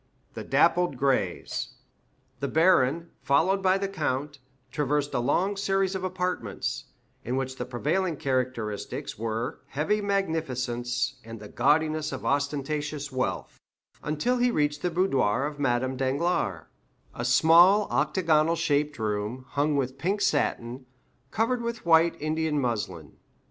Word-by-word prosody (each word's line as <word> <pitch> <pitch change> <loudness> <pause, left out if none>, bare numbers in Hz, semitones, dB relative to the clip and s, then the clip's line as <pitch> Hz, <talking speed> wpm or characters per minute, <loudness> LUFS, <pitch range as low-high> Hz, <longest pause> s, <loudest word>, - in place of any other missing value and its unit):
The - - -6
Dappled 175 -6 +2
Grays 125 -9 -1 0.6
The 140 - -2
baron, 165 -1 +3
followed 190 +8 +2
by 190 0 +3
the 195 0 -2
count, 145 -6 -3 0.3
traversed 145 0 -1
a - - +1
long 175 +11 +1
series 195 -1 0
of 190 -1 -4
apartments, 180 - -3 0.4
in 125 - -2
which 130 0 -3
the - - -4
prevailing 160 +7 -1
characteristics 125 -8 -3
were 115 +1 -3
heavy 200 +9 0
magnificence 130 -11 -1
and 115 0 -9
the 105 - -10
gaudiness 155 +3 +1
of 130 - -6
ostentatious 145 +1 -2
wealth, 130 0 -3 0.4
until 155 +12 0
he 245 0 +3
reached 150 -7 0
the 180 - 0
boudoir 140 - +1
of 145 0 -5
Madame 130 -1 0
Danglars—a 130 - -3
small 170 +10 +6
octagonal 165 -3 +2
shaped 145 -1 0
room, 110 +3 -3
hung 145 +2 0
with 135 -1 -2
pink 195 +8 0
satin, 130 -5 -1 0.4
covered 235 +3 0
with 235 -3 -5
white 165 0 +4
Indian 155 0 -1
muslin. 105 - -3
145 Hz, 130 wpm, -27 LUFS, 130-175 Hz, 0.6 s, small